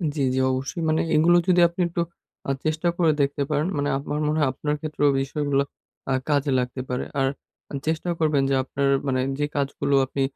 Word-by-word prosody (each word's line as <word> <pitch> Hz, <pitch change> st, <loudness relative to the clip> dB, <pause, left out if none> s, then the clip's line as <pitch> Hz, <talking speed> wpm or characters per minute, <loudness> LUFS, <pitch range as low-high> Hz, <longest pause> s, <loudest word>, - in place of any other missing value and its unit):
জি, 145 Hz, -, -1 dB
জি 130 Hz, -, +1 dB
অবশ্যই 135 Hz, +6 st, -3 dB
মানে 155 Hz, -, +2 dB
এগুলো 170 Hz, +3 st, +5 dB
যদি 180 Hz, -1 st, +5 dB
আপনি 170 Hz, +2 st, -4 dB
একটু 170 Hz, 0 st, -2 dB, 0.5 s
আ -, -, +3 dB
চেষ্টা 155 Hz, +2 st, 0 dB
করে 165 Hz, -3 st, +4 dB
দেখতে 140 Hz, +1 st, 0 dB
পারেন, 150 Hz, +2 st, +1 dB
মানে 145 Hz, 0 st, 0 dB
আমার 145 Hz, +2 st, -3 dB
মনে 155 Hz, +1 st, +1 dB
হয় 145 Hz, -3 st, +3 dB
আপনার 150 Hz, +2 st, -2 dB
ক্ষেত্রেও 150 Hz, -2 st, +1 dB
বিষয়গুলা 140 Hz, 0 st, 0 dB, 0.5 s
আ -, -, +3 dB, 0.2 s
কাজে 145 Hz, -1 st, +2 dB
লাগতে 125 Hz, +1 st, -3 dB
পারে 125 Hz, -, -1 dB, 0.2 s
আর 135 Hz, -, +3 dB, 0.4 s
আ -, -, -9 dB
চেষ্টাও 160 Hz, +2 st, -1 dB
করবেন 150 Hz, -4 st, +2 dB
যে 135 Hz, -, +2 dB
আপনার 140 Hz, +1 st, -1 dB, 0.2 s
মানে 130 Hz, -1 st, +1 dB, 0.2 s
যে 145 Hz, -, +2 dB
কাজগুলো 140 Hz, 0 st, 0 dB
আপনি 135 Hz, +1 st, -4 dB
145 Hz, 195 wpm, -24 LUFS, 140-155 Hz, 0.5 s, এগুলো